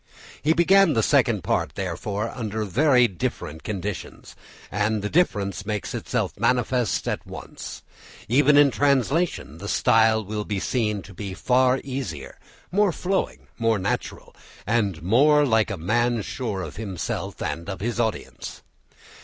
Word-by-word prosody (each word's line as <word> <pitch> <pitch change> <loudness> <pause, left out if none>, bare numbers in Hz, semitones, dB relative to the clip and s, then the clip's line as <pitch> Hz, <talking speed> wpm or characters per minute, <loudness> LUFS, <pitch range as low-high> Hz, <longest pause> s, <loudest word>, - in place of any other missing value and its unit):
He 155 +2 +3
began 175 +1 +5
the 110 - +2
Second - - +3
Part, - - -1
therefore, 100 +4 -3
under 110 -2 -3
very 125 - +4
different 80 -4 -4
conditions, 100 -1 -6 0.4
and 105 +1 0
the 105 - -3
difference 100 - +1
makes 105 0 -3
itself - - -2
manifest 125 -1 +1
at - - -3
once. - - -9 0.4
Even 145 +5 +4
in 145 -1 +6
translation 140 - +1
the 100 - -6
style 110 0 +3
will 105 +1 -3
be 105 -2 -3
seen 105 -3 -1
to 95 +3 -12
be 95 +1 -6
far 125 +5 +3
easier, 115 - -6 0.3
more 200 +1 +3
flowing, 190 +3 -2
more 115 -1 +2
natural, 95 0 -4 0.3
and 100 -7 0
more 145 - +5
like 110 -4 +3
that 100 - -3
of 85 - -11
a - - -10
man 120 +3 +1
sure 105 -7 -4
of 80 0 -8
himself 100 -5 -4
and 85 +4 -4
of 95 - -5
his 115 +2 -2
audience. 110 -2 -3
110 Hz, 150 wpm, -24 LUFS, 100-130 Hz, 0.4 s, in